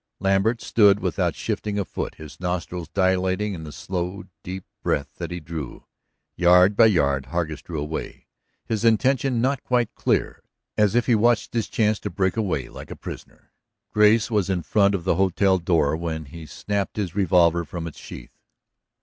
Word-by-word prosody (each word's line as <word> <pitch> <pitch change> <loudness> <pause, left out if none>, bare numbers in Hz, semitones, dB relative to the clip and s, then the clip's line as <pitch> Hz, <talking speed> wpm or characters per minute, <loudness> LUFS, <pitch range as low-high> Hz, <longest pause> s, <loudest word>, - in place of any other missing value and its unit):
Lambert 95 +4 +1
stood 100 -3 +4
without - - -1
shifting 105 -1 -3
a 100 - -1
foot, - - -5
his 75 0 -12
nostrils 90 -1 -3
dilating 95 +2 +1
in 80 -3 -7
the 75 - -8
slow, 90 +4 -4 0.2
deep 95 +1 -7 0.2
breath 70 - -1
that - - -5
he 90 - -5
drew. 75 -3 -7 0.5
Yard 90 +3 +5
by 115 +2 +7
yard 70 -9 +1
Hargus 80 -1 -3
drew 80 0 -6
away, 75 +2 -5 0.4
his 110 -1 -2
intention 125 +2 +2
not 135 +1 0
quite 120 -3 0
clear, - - -1 0.3
as 105 0 +2
if 120 - +3
he 125 - +3
watched 115 +1 +2
his 115 -2 -1
chance 110 -1 +1
to 105 - -4
break 95 0 0
away 90 - -1
like - - -11
a - - -7
prisoner. - - -10 0.4
Grace 105 +2 +4
was 105 -3 +1
in 90 -3 -1
front 100 +4 +3
of 90 - -4
the 90 -2 +1
hotel 95 0 +2
door 80 -4 +2
when 80 -1 -4
he 80 +3 -10
snapped 100 +3 -3
his 95 -6 -2
revolver 85 -3 +3
from 85 +1 -6
its 80 - -8
sheath. - - -10
95 Hz, 175 wpm, -23 LUFS, 85-105 Hz, 0.5 s, by